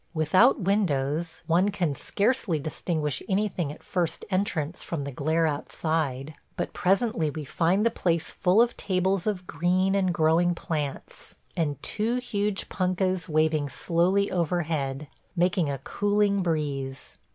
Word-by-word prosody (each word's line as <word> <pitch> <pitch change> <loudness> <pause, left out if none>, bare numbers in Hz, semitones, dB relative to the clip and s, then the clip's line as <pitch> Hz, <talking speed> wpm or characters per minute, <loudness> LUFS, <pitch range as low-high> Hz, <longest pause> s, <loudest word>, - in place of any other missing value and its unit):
Without 185 - +4
windows, 165 -5 0
one 175 +5 +3
can 175 -7 -1
scarcely 200 - 0
distinguish 150 -1 -2
anything 190 -6 0
at 150 - -12
first 175 -3 -2
entrance 180 -4 -1
from 160 -4 -4
the 140 - -5
glare 160 +5 +1
outside; 150 -2 -2 0.2
but - - -3
presently 195 -4 +1
we 150 0 -6
find 180 - +1
the 230 - +3
place 170 -5 -1
full 190 +6 +4
of 240 - -2
tables 190 0 0
of 190 -4 -1
green 180 +4 +1
and 190 -2 +2
growing 170 +1 +3
plants, 150 -5 -5 0.2
and 145 -5 -1
two 225 +3 -1
huge 210 -5 -2
punkahs 185 -1 0
waving 155 -1 +2
slowly 180 +7 +1
overhead, 155 -5 -1 0.3
making 175 -2 +2
a 140 - -2
cooling 205 +5 +1
breeze. 145 -6 -3
175 Hz, 135 wpm, -26 LUFS, 155-195 Hz, 0.3 s, Without